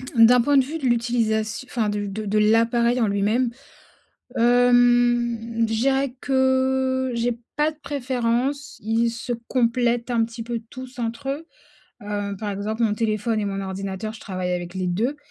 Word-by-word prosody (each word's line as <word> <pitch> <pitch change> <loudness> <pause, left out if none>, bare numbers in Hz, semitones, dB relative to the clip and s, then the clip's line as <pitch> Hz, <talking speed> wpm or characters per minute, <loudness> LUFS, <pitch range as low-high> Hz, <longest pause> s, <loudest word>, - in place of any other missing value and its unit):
D'un 235 +2 +7
point 285 +4 +3
de 270 - +6
vue 305 +5 -5
de 280 - -5
l'utilisat 235 -2 +1 0.2
enfin 230 -4 -1
de 205 0 -2
de 210 +1 -2
l'appareil 230 +3 +3
en 225 - +3
lui-même. 215 +5 +1 0.9
Hem, 240 0 +4 0.3
je 225 - -1
dirais 270 +2 +1
que 260 -1 +1
j'ai 235 0 -1 0.2
pas 300 +2 +2
de 310 - -15
préférence, 265 0 -2
ils 225 +2 +1
se 230 +1 -5 0.2
complètent, 240 -1 +1
un 230 -2 +2
petit 230 0 -7
peu, 230 0 -4
tous 255 0 -10
entre 235 +4 -4
eux. 300 +4 -3 0.6
Heu, 205 -1 -3
par 210 0 -3
exemple 210 +3 -3
mon 215 -2 +2
téléphone 220 +1 0
et - - -1
mon 195 -1 -3
ordinateur, 195 +2 -5
je - - -12
travaille 185 -2 -3
avec 175 0 -4
les 185 -1 -2
2 225 +11 0
235 Hz, 165 wpm, -23 LUFS, 215-255 Hz, 0.9 s, D'un